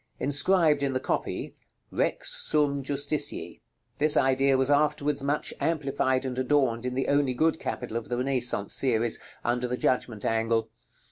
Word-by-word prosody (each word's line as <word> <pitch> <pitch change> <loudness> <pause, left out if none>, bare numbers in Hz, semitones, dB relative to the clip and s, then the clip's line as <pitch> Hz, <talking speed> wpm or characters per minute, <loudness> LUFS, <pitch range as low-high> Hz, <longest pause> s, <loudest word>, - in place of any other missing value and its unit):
Inscribed 150 +1 +3
in 140 -1 0
the 130 - 0
copy, - - -3 0.4
"REX - - -1
SUM 145 -2 +1
JUSTICIE." 145 +2 -2 0.4
This 150 +1 +3
idea 135 +1 +3
was 130 +2 +1
afterwards 145 0 +1
much 145 +2 -1
amplified 140 -4 0
and 130 -1 -3
adorned 130 -3 +1
in 125 - -3
the 135 - -1
only 140 -3 +1
good 160 +5 +1
capital 120 -2 -4
of 115 - -6
the 120 - -1
Renaissance 125 -5 0
series, 120 -3 +1 0.3
under 120 +1 0
the 125 +1 -3
Judgment 120 -5 -1
angle. 115 0 0
135 Hz, 150 wpm, -27 LUFS, 125-145 Hz, 0.4 s, Inscribed